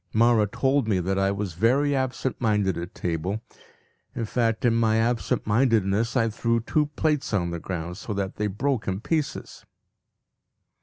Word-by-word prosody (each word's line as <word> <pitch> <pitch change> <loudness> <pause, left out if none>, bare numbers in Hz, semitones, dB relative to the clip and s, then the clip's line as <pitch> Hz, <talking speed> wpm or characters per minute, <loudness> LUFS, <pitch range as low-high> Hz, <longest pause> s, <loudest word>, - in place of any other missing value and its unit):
Mawra 115 -1 +4
told 135 -2 +1
me 100 -4 +2
that 95 +2 -1
I 95 0 +2
was 100 -2 -3
very 135 - +2
absent 130 0 -2
minded 105 -5 +2
at 85 +1 -6
table. 90 +5 -2 0.7
In 115 - -2
fact, 115 +1 0
in 120 - +4
my 115 -1 +2
absent 115 +1 0
mindedness 115 0 +2
I 115 -1 +2
threw 115 +2 0
two 150 +6 0
plates 150 -8 0
on 85 -3 0
the 85 - -4
ground 90 0 -5
so 110 - -7
that 100 -1 -3
they 105 - 0
broke 120 +4 -1
in 95 0 -1
pieces. 155 +2 -3
110 Hz, 165 wpm, -25 LUFS, 95-120 Hz, 0.7 s, Mawra